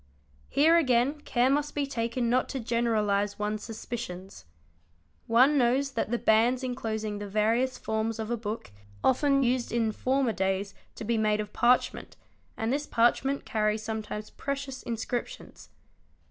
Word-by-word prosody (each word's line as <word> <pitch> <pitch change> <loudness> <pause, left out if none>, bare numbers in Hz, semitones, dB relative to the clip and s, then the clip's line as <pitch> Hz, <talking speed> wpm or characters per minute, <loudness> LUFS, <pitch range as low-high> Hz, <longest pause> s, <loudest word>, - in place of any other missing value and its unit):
Here 320 +4 +5
again 270 0 +2
care 250 -2 +2
must 295 +1 0
be 290 -1 0
taken 235 -2 -2
not 250 +2 +1
to 270 - -3
generalise 215 -4 0
one's 210 0 -2
suspicions. 215 - -7 0.8
One 260 +6 +5
knows 260 +3 +2
that 230 - -2
the 240 - 0
bands 235 +4 +3
enclosing 220 -4 -3
the 205 - -5
various 225 +5 +1
forms 220 0 -2
of 220 +1 -4
a - - +2
book 215 - -5
used 100 0 -24
often 275 +1 +3
in 235 -2 +1
former 260 +1 0
days 195 +1 -1 0.2
to - - -7
be 225 +1 0
made 215 -1 +2
of 210 0 -5
parchment, 245 +1 +1 0.4
and 225 +3 -1
this 290 +1 -2
parchment 250 +4 +2
carries 215 0 0
sometimes 215 -1 -5
precious 275 -1 -4
inscriptions. 235 +1 -5
230 Hz, 145 wpm, -28 LUFS, 215-255 Hz, 0.8 s, Here